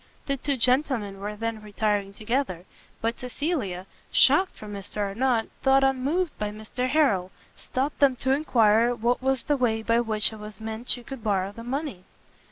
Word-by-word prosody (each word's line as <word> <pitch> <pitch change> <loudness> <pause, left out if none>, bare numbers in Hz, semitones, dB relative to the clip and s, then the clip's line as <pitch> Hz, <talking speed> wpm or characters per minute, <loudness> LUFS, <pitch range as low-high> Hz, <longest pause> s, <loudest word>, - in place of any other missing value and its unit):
The 275 - 0
two 275 +1 -2
gentlemen 240 -6 +1
we 210 +1 -4
then 225 0 -3
retiring 205 -1 -1
together; 215 -4 -2 0.4
but 230 +1 -1
Cecilia, 250 - -3 0.3
shocked 375 0 +5
for - - -11
Mr 205 0 -7
Arnott, 225 +3 0
though 270 0 +4
unmoved 270 +6 +1
by 210 - -1
Mr 215 +4 -4
Harrel, 235 -12 +2 0.3
stopt 270 +3 -3
them 275 -3 +5
to 260 +2 -1
enquire 235 -4 +3
what 240 +2 0
was 265 -1 +1
the 295 -1 +1
way 225 -3 +1
by 230 +1 +3
which 220 -2 +2
it 220 - -10
was 210 +1 -9
meant 220 +2 -6
she 245 - 0
could 265 -2 -8
borrow 195 -2 0
the 230 +3 -10
money? 260 - -4
230 Hz, 175 wpm, -26 LUFS, 210-265 Hz, 0.4 s, shocked